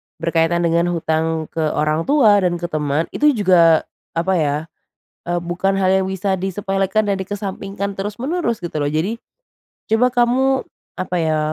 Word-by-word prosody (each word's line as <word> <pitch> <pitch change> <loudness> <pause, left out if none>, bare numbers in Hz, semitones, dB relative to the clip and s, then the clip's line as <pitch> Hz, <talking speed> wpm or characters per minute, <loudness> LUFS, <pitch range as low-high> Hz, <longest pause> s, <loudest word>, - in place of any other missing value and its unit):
berkaitan 170 +1 +1
dengan 170 +1 +2
hutang 160 0 -1
ke - - -5 0.2
orang 155 +2 0
tua 230 -8 +5
dan 180 -2 +1
ke 175 0 -5
temen 150 0 0
itu 295 -3 +3
juga 175 -6 +4 0.3
apa 170 +3 +1
ya, 145 -2 +1 0.7
eee, 175 0 -1
bukan 175 +3 -1
hal 190 -1 +2
yang 190 - -1
bisa 190 0 -1
disepelekan 195 +2 -1
dan 195 - 0
dikesampingkan 195 0 -5
terus-menerus 235 - -2
gitu 170 -3 -4
loh. 145 - 0
Jadi, 165 +10 -1 0.8
coba 250 +3 +3
kamu 260 +2 +2 0.3
apa 185 0 -2
ya, 155 -1 +1
185 Hz, 150 wpm, -19 LUFS, 165-205 Hz, 0.8 s, tua